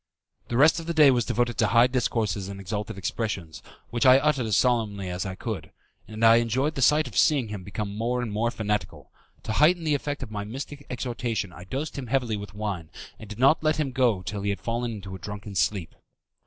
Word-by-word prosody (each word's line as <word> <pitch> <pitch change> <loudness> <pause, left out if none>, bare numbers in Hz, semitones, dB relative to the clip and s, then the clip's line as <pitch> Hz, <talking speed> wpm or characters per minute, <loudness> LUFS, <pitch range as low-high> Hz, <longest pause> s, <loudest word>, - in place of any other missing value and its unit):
The 120 - -2
rest 150 +5 +5
of 165 - -8
the 170 - -2
day 150 -3 +7
was 120 -3 +1
devoted 120 -2 -1
to - - +4
high 115 +1 +5
discourses 115 -6 -1
and 100 0 -7
exalted 100 +1 -4
expressions, 95 -5 -4 0.3
which 120 0 0
I 130 0 +8
uttered 140 -4 +1
as 105 - +2
solemnly 105 -7 +1
as 90 +2 -3
I 95 - -5
could, - - -5 0.4
and 110 +1 -1
I 115 +1 +8
enjoyed 125 +6 +1
the 135 - -4
sight 150 +4 +4
of - - -10
seeing 140 -8 +3
him 105 -3 -6
become 100 +1 -5
more 120 +3 -1
and 115 - -4
more 110 +3 0
fanatical. 105 -3 -3 0.3
To - - -4
heighten 165 +8 +4
the 155 -2 +1
effect 145 -1 -2
of 115 - -8
my 100 -1 -3
mystic 140 +6 -7
exhortation 120 -6 -3
I 90 - -11
dosed 140 +8 -4
him 130 - -6
heavily 125 -3 0
with 100 0 -8
wine, 100 -7 -4 0.3
and 110 - -11
did 105 - -8
not 135 +6 +4
let 155 0 +2
him 145 -3 0
go 120 -8 +1
till 100 +1 -4
he 100 - -1
had 100 - -2
fallen 120 +1 -2
into 100 -3 -7
a - - -9
drunken 100 +2 -7
sleep. 90 0 0
115 Hz, 225 wpm, -26 LUFS, 100-130 Hz, 0.4 s, I